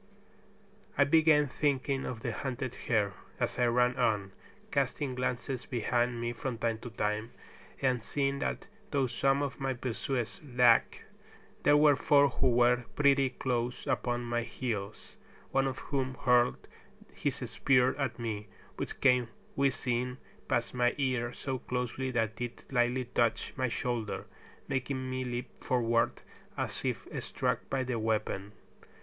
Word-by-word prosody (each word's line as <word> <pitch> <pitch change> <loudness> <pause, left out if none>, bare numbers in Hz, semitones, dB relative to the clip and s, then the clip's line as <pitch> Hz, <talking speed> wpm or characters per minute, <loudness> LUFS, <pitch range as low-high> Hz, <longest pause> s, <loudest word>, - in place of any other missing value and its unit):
I - - +7
began 155 -1 +5
thinking 140 -1 0
of 120 -3 -5
the 120 - -2
hunted 130 +1 -3
hare, 105 -4 0 0.3
as - - -1
I 120 - +4
ran 125 +1 +3
on, 105 -6 +1 0.4
casting 140 0 0
glances 125 +1 -2
behind 120 0 0
me 120 0 -2
from 125 0 -4
time 115 -1 -1
to 120 - -7
time, 105 +1 -2 0.5
and 125 -3 +2
seeing 140 +4 -1
that 195 - -2 0.2
though 140 -3 +2
some 135 +3 +2
of 140 - -4
my 135 -1 -1
pursuers 125 - -3
lagged, 125 -4 +4 0.6
there 145 - +5
were 150 -1 +6
four 140 +1 +5
who 130 - +1
were 120 0 +5 0.2
pretty 140 -2 +4
close 125 -1 -2
upon 120 0 0
my 120 0 0
heels, 110 -4 -5 0.3
one 135 0 +2
of 130 - -3
whom 130 -2 -2
hurled 125 -1 +3 0.5
his - - -1
spear 130 -1 +3
at 135 -4 -1
me, 110 -3 -4 0.3
which - - -5
came 125 -3 +4 0.3
whizzing 125 -2 0 0.3
past 120 -1 0
my 120 -1 +2
ear 130 -4 0
so 130 0 -4
closely 125 +2 -2
that 115 -2 -1
it 120 -1 -5
lightly 125 0 +2
touched 115 -1 0
my 130 -1 0
shoulder, 120 -2 -2 0.4
making 130 0 -2
me 130 0 -2
leap 120 -1 -5
forward 115 -2 +1 0.3
as - - -3
if - - -2 0.2
struck - - -1
by 135 -1 0
the 125 -2 -2
weapon. 105 -2 -1
125 Hz, 145 wpm, -31 LUFS, 120-135 Hz, 0.6 s, I